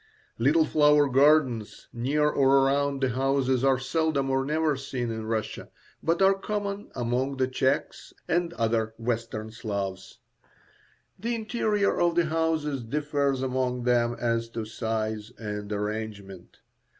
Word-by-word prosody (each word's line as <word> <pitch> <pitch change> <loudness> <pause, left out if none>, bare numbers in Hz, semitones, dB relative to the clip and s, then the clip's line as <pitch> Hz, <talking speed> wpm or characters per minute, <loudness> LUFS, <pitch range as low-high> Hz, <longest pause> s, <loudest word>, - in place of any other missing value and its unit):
Little 150 +7 +4
flower 150 -1 +4
gardens 135 -5 +2
near 140 +6 +1
or 135 -2 +4
around 140 0 +1
the 130 - +2
houses 130 0 +1
are 135 -1 +4
seldom 140 0 0
or 135 0 +1
never 155 +1 +1
seen 130 -3 -4
in 110 -1 -5
Russia, 110 -1 -3 0.3
but 170 +3 +1
are 195 0 +6
common 200 +1 -4
among 125 +3 -1
the 130 -1 +1
Czechs 130 +1 -1 0.2
and 170 0 +1
other 115 -3 0
Western 115 -2 -3
Slavs. 100 -4 -5 1.0
The 235 +1 -1
interior 215 -2 0
of 170 -1 +2
the 175 -1 +3
houses 155 -4 -1
differs 140 +1 -1
among 125 -1 -1
them 120 -1 +2
as 115 -1 0
to 110 - -2
size 110 0 -3
and 105 -1 -5
arrangement. 105 -3 -5
130 Hz, 135 wpm, -27 LUFS, 115-150 Hz, 1.0 s, are